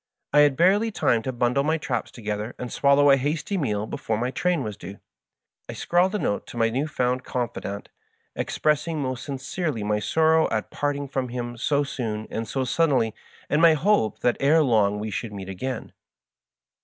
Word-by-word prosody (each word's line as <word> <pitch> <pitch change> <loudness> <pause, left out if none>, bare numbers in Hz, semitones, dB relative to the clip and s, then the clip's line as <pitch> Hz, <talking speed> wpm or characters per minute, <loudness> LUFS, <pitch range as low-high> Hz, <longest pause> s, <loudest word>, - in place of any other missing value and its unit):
I 150 - +6
had 145 -2 +5
barely 200 +7 +4
time 120 - +1
to 130 - -3
bundle 125 +2 +1
my 155 +2 +1
traps 135 -5 -3
together 105 0 -5
and 125 - -6
swallow 140 0 +5
a 135 - +6
hasly 155 +8 -2
meal 105 - -1
before 110 0 -3
my 125 +3 -1
train 180 +4 0
was 105 -1 -5
due. 95 +1 -10 0.7
I - - -4
scrawled 180 +4 +1
a - - +2
note 100 - -2
to - - -9
my 115 -1 +2
new 135 +6 -1
found 125 -3 -1
confidant, 105 -4 -4 0.5
expressing 155 +1 0
most 130 -2 -3
sincerely 140 - -3
my 105 0 0
sorrow 160 +6 +3
at 110 - -2
parting 145 -1 -2
from 130 -2 -3
him 120 0 -4
so 145 +4 +1
soon 110 -6 -4
and 115 0 -3
so 135 - -1
suddenly, 130 -5 +1 0.3
and 150 - +1
my 165 -2 +7
hope 155 - +1
that 120 - +2
ere 155 +3 +4
long 105 -6 +2
we 105 +1 -4
should 110 +2 -4
meet 95 -1 -7
again. 115 +6 -4
in. - - -20
130 Hz, 190 wpm, -25 LUFS, 110-150 Hz, 0.7 s, my